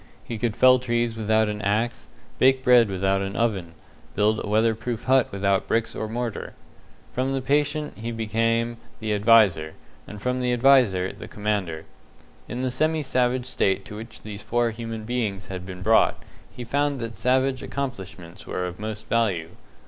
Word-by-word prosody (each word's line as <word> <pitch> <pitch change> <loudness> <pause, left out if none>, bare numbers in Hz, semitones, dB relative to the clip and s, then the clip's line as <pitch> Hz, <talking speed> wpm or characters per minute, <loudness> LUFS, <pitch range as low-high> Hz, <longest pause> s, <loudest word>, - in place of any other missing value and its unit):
He 115 -2 -6
could 115 -2 -1
fell 130 0 +6
trees 120 -2 -1
without 110 0 +2
an 105 0 -3
axe, 110 +4 -1 0.3
bake 130 0 +4
bread 120 -4 +6
without 95 +1 0
an 100 +1 -4
oven, 95 -8 -1 0.4
build 105 +1 +2
a - - -5
weatherproof 110 +2 0
hut 130 -1 +3
without 100 0 0
bricks 115 0 0
or 110 - -4
mortar. 115 -1 -4 0.6
From 130 +2 -1
the 135 - 0
patient 145 +1 0
he 115 +2 -4
became 115 +1 0 0.2
the 110 -1 -1
adviser; 100 -7 +4 0.3
and 105 - -9
from 125 +3 -1
the 125 0 +1
adviser, 120 -8 +4
the - - -10
commander. 100 -7 -2 0.6
In 125 +2 -4
the 130 - 0
semi 155 +3 0
savage 125 -1 0
state 95 -6 0
to 105 - -9
which 110 +1 -10
these 105 -1 -7
four 120 +1 0
human 115 -1 -6
beings 110 -5 -3
had 90 -1 -6
been 90 -1 -7
brought, 110 +2 +4 0.3
he 125 - -8
found 140 +3 0
that 115 -1 -5
savage 130 +1 +1
accomplishments 95 -9 -6
were 90 - -2
of 90 +1 -6
most 110 0 -6
value. 100 -8 0
115 Hz, 170 wpm, -24 LUFS, 100-125 Hz, 0.6 s, fell